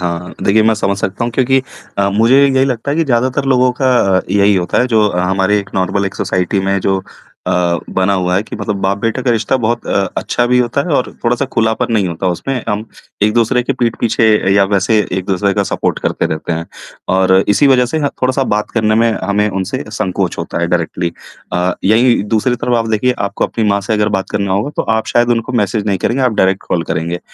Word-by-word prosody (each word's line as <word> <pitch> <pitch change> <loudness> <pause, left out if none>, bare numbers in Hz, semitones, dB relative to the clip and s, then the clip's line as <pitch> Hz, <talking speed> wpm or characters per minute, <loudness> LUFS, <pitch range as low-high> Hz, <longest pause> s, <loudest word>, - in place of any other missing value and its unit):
हाँ, 85 -1 -2
हाँ। 90 +1 -10
देखिए 110 +2 +3
मैं 110 0 +3
समझ 100 -2 -1
सकता 100 +4 -2
हूँ 120 - -3
क्योंकि 130 +2 +2 0.4
अ, 100 0 +2
मुझे 115 +6 +3
यही 135 -1 +2
लगता 130 0 -2
है 145 - -1
कि 165 - +2
ज़्यादातर 130 +1 0
लोगों 130 -2 +3
का 130 - +2 0.3
अ, - - 0
यही 100 0 +3
होता 90 -2 0
है 125 - +2
जो 110 -4 +3
हमारे 95 +3 +1
नॉर्मल, 95 +2 0
एक 95 - -6
सोसाइटी 95 +1 -1
में 95 +1 0
जो 95 +1 0 0.4
अ, - - 0 0.4
बना 95 +1 +1
हुआ 90 -2 0
है 100 - +1
कि - - -8
मतलब 105 -2 -3
बाप 95 +1 0
बेटे 115 +4 -2
का 125 - +1
रिश्ता 115 +2 +1
बहुत 120 -1 -2
अ, - - -4 0.3
अच्छा 120 - 0
भी 125 +1 +3
होता 125 +2 0
है 150 - +1
और 125 - 0
थोड़ा-सा 120 +3 +1
खुलापन 110 +1 0
नहीं 100 -5 +1
होता 85 +2 -4
उसमें 125 +8 -3
हम 105 0 -1 0.4
एक-दूसरे 115 +4 +2
के 130 - -1
पीठ 120 -3 -1
पीछे 115 -1 +1 0.3
या 100 0 +5
वैसे 100 +3 +2
एक-दूसरे 95 +2 0
का - - +1
सपोर्ट - - -1
करते - - -1
रहते 80 +2 -3
हैं। 80 0 -3 0.5
और 95 0 +3 0.2
इसी 105 +8 +4
वजह 130 -2 +4
से 160 +6 -2
ना 145 -2 0
थोड़ा-सा 130 +1 +1
बात 105 0 -2
करने 110 -2 +1
में 115 +1 +3
हमें 100 +2 +1
उनसे 95 -2 -3
संकोच 90 -1 -2
होता - - -4
है 85 - +1
डायरेक्टली 85 0 -1 0.4
अ, 90 +1 +1
यही 115 +4 +3
दूसरी 120 +3 +1
तरफ़ 125 +1 -1
आप 115 0 -2
देखिए, 110 +4 +1
आपको 100 0 -1
अपनी 115 - -2
माँ 100 0 +1
से 100 +2 -3
अगर 105 -1 +1
बात 95 - -6
करना 100 -2 -1
होगा 100 +9 -1
तो - - +1
आप 110 - -2
शायद 120 0 +2
उनको 115 +1 -1
मैसेज 105 +1 -2
नहीं 100 -2 0
करेंगे, 130 +8 -1
आप 125 -2 +2
डायरेक्ट 95 -1 +1
कॉल 85 - 0
करेंगे। 85 +2 -3
105 Hz, 225 wpm, -15 LUFS, 95-120 Hz, 0.5 s, या